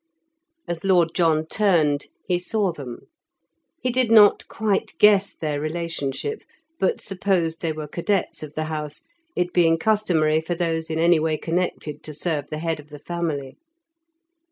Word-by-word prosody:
As 170 -1 -4
Lord 180 -4 +3
John 160 -3 +2
turned, 160 -7 +2 0.2
he 180 -1 +1
saw 200 +1 0
them. 135 -7 -8 0.8
He 250 - -1
did 250 -1 +1
not 215 -3 +6
quite 210 -3 -1
guess 205 -1 +5
their 150 -2 -3
relationship, 165 - -3 0.4
but 190 - +1
supposed 185 -4 -1
they 165 - -1
were 155 -1 -5
cadets 185 +5 -1
of 155 -1 -8
the 155 - -1
house, 155 - -5 0.3
it 180 0 -1
being 165 -2 +4
customary 165 -6 +2
for 170 +2 -3
those 165 -2 -1
in 160 - -2
any 170 0 +4
way 155 0 0
connected 165 -3 -2
to 150 - -5
serve 150 -2 -1
the 155 - -4
head 165 0 -2
of 150 0 -13
the 150 - -9
family. 155 -4 -4
165 Hz, 155 wpm, -23 LUFS, 155-185 Hz, 0.8 s, not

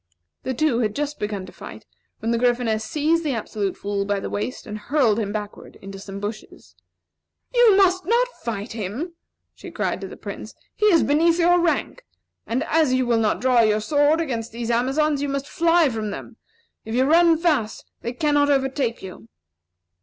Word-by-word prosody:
The 260 - -3
two 290 -4 +1
had 215 -3 -1
just 295 0 -3
begun 205 -2 -3
to - - -12
fight - - -11 0.4
when 225 - -1
the 235 - +1
Gryphoness 240 -3 +1
seized 310 +8 0
the 285 -5 -1
Absolute 210 -3 -3
Fool 200 0 -2
by 200 0 -1
the - - -6
waist 210 +5 -4
and 215 -2 -6
hurled 235 -2 +2
him 205 -2 -2
backward 210 -1 -7
into 195 0 -9
some 195 0 -8
bushes. 210 +2 -8 0.8
"You 475 -5 +6
must 370 -1 +3
not 475 +3 +3
fight 220 -1 -4
him!" 225 - -5 0.4
she - - -11
cried - - -2
to - - -5
the - - -11
Prince. - - -8 0.2
"He 425 - +1
is 340 -6 +5
beneath 330 +4 +3
your 350 0 +4
rank! 345 +8 -1 0.4
And 250 +5 -1
as 315 -5 +2
you 255 0 +1
will 235 -1 +2
not 215 -2 0
draw 250 -2 +4
your 215 -1 +3
sword 290 +7 +2
against 235 -8 -3
these 235 +1 -3
Amazons 275 +5 +1
you 285 - -1
must 275 0 -3
fly 335 -2 +3
from 220 -3 -3
them. 225 +3 -8 0.5
If 220 +1 -5
you 255 - +3
run 330 +2 +5
fast 300 -10 0 0.2
they 235 - -3
cannot 290 +2 +2
overtake 270 -4 0
you." 180 -12 -10
255 Hz, 190 wpm, -23 LUFS, 215-310 Hz, 0.8 s, You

